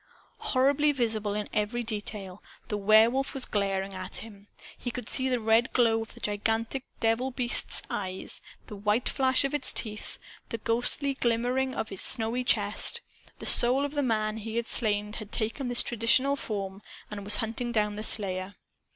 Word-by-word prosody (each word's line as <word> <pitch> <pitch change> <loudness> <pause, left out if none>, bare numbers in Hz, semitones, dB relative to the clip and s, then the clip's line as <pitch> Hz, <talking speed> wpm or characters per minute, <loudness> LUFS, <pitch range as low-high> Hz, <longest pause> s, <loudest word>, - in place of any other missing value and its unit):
Horribly 280 +3 +2
visible 220 -6 -1
in 210 0 -3
every 215 +3 -1
detail, 205 -3 -4 0.3
the 210 - -1
Werewolf 225 +7 +3
was 265 - +4
glaring 195 -1 -2
at 185 0 -7
him. 205 -2 -9 0.3
He 245 - -5
could 245 +1 -6
see 260 0 +5
the 250 -1 +1
red 225 +2 +2
glow 230 -2 +3
of 225 - -9
the - - -12
gigantic 225 +5 -2
devil 225 +3 +1
beast's 245 -2 +1
eyes, 185 -2 -6 0.2
the 210 - -9
white 210 +4 0
flash 260 -1 +3
of 275 - -2
its 290 -3 +1
teeth, 210 -1 -5 0.3
the 230 - -3
ghostly 245 +5 0
shimmering 250 +3 0
of 220 - -4
its 195 - -5
snowy 230 +2 0
chest. 220 - +1 0.4
The - - -9
soul 255 +4 +5
of 285 - -5
the 290 - 0
man 215 -4 -1
he 220 +1 -5
had 235 0 -1
slain 210 -1 0
had 215 -2 -8
taken 230 +4 -1
this 245 -1 0
traditional 245 +4 +3
form 200 -6 -5 0.3
and 205 -1 -6
was 205 +1 +7
hunting 230 +3 -2
down 210 -2 0
the 210 - -5
slayer! 190 -3 +1
225 Hz, 175 wpm, -28 LUFS, 210-250 Hz, 0.4 s, was